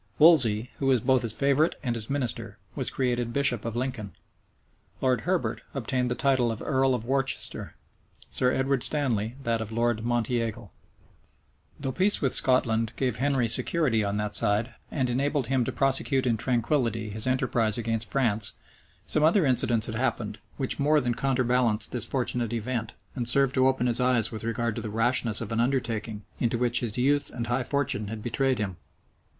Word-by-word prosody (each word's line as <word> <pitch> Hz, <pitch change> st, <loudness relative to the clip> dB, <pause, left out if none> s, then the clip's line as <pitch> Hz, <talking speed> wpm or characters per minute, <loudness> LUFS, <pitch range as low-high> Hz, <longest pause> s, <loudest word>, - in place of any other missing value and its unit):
Wolsey, 125 Hz, -8 st, +4 dB
who 135 Hz, -, -1 dB
was 130 Hz, -2 st, +4 dB
both 130 Hz, +2 st, +2 dB
his 115 Hz, -3 st, -1 dB
favorite 140 Hz, +7 st, +1 dB
and 120 Hz, -4 st, -1 dB
his 110 Hz, -1 st, -3 dB
minister, 135 Hz, -4 st, -2 dB, 0.2 s
was -, -, -1 dB
created 120 Hz, -2 st, -1 dB
bishop 130 Hz, -4 st, +1 dB
of 115 Hz, -1 st, -5 dB
Lincoln. 120 Hz, -5 st, -4 dB, 0.9 s
Lord 130 Hz, -3 st, +1 dB
Herbert 180 Hz, +3 st, -1 dB
obtained 125 Hz, -1 st, -1 dB
the 120 Hz, -, -1 dB
title 130 Hz, -4 st, +1 dB
of 110 Hz, -, -5 dB
earl 135 Hz, -2 st, +1 dB
of 115 Hz, -2 st, -5 dB
Worcester; 135 Hz, +1 st, -1 dB, 0.6 s
Sir 125 Hz, 0 st, +1 dB
Edward 135 Hz, 0 st, 0 dB
Stanley, 120 Hz, -7 st, +1 dB
that 115 Hz, -2 st, -1 dB
of 110 Hz, -1 st, -6 dB
Lord 115 Hz, -1 st, 0 dB
Monteagle. 115 Hz, -2 st, -2 dB, 1.1 s
Though 135 Hz, -2 st, -3 dB
peace 190 Hz, +7 st, +2 dB
with 135 Hz, -4 st, 0 dB
Scotland 115 Hz, -3 st, +3 dB
gave 125 Hz, -4 st, -1 dB
Henry 135 Hz, -2 st, +1 dB
security 120 Hz, -1 st, +3 dB
on 100 Hz, 0 st, -2 dB
that 105 Hz, 0 st, -3 dB
side, 105 Hz, +3 st, 0 dB, 0.2 s
and 130 Hz, -4 st, -1 dB
enabled 140 Hz, +2 st, -1 dB
him 135 Hz, -2 st, +1 dB
to 130 Hz, -, -2 dB
prosecute 135 Hz, +1 st, +1 dB
in 120 Hz, -2 st, +2 dB
tranquillity 115 Hz, -2 st, -1 dB
his 110 Hz, +4 st, -2 dB
enterprise 125 Hz, -4 st, +1 dB
against 115 Hz, -1 st, -1 dB
France, 110 Hz, -6 st, 0 dB, 0.5 s
some 155 Hz, -, +2 dB
other 165 Hz, +2 st, +4 dB
incidents 120 Hz, -3 st, +3 dB
had 115 Hz, -, -4 dB
happened, 110 Hz, -3 st, -2 dB, 0.2 s
which 135 Hz, 0 st, -1 dB
more 150 Hz, +2 st, +3 dB
than 125 Hz, -3 st, -1 dB
counterbalanced 125 Hz, -3 st, +1 dB
this 120 Hz, -3 st, 0 dB
fortunate 120 Hz, -3 st, -2 dB
event, 115 Hz, 0 st, -3 dB, 0.2 s
and 120 Hz, -3 st, -3 dB
served 135 Hz, +1 st, +2 dB
to 130 Hz, -1 st, +3 dB
open 130 Hz, -2 st, 0 dB
his 120 Hz, 0 st, +3 dB
eyes 125 Hz, -3 st, +2 dB
with 110 Hz, -2 st, -6 dB
regard 115 Hz, 0 st, -2 dB
to 115 Hz, -, -4 dB
the 110 Hz, -, -5 dB
rashness 115 Hz, 0 st, +1 dB
of 115 Hz, -, -5 dB
an 115 Hz, -, -1 dB
undertaking, 115 Hz, -4 st, -2 dB, 0.2 s
into 120 Hz, -1 st, 0 dB
which 120 Hz, 0 st, +2 dB
his 115 Hz, -2 st, -3 dB
youth 140 Hz, +3 st, +1 dB
and 120 Hz, -1 st, -5 dB
high 120 Hz, +2 st, 0 dB
fortune 130 Hz, -6 st, -1 dB
had 110 Hz, 0 st, -7 dB
betrayed 130 Hz, +2 st, 0 dB
him. 100 Hz, -4 st, -4 dB
120 Hz, 180 wpm, -26 LUFS, 115-135 Hz, 1.1 s, Wolsey